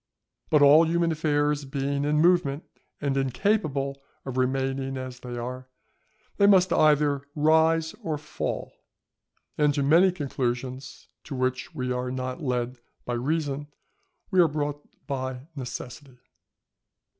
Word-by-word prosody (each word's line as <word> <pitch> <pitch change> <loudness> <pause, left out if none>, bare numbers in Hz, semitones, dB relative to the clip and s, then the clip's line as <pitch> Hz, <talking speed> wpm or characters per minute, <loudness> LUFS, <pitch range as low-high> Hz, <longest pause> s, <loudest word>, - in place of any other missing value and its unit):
But 150 -2 +5
all 155 +3 +7
human 170 0 +1
affairs 150 -2 +1
being 140 +1 -2
in 150 +1 +2
movement, 170 -4 +3 0.4
and 140 -2 0
incapable 140 - 0 0.2
of 130 -2 -5
remaining 135 +1 -1
as 130 -1 -6
they 120 -1 -7
are, 125 +2 -6 0.7
they 200 - +5
must 190 -2 +5
either 150 -2 +3
rise 160 +1 +3
or 155 -2 -2
fall; 150 +1 -4 0.9
and 150 -1 +3
to 140 - +1
many 170 +7 +5
conclusions 130 -4 -4 0.2
to 140 - -6
which 130 +4 -2
we 125 -3 -2
are 125 0 -2
not 130 +3 -4
led 125 -2 -2 0.3
by 120 - -3
reason, 145 +3 -2 0.6
we 185 - +3
are 170 - +7
brought 145 -1 -3 0.2
by 130 -2 -4
necessity. 130 0 -7
140 Hz, 130 wpm, -26 LUFS, 130-155 Hz, 0.9 s, all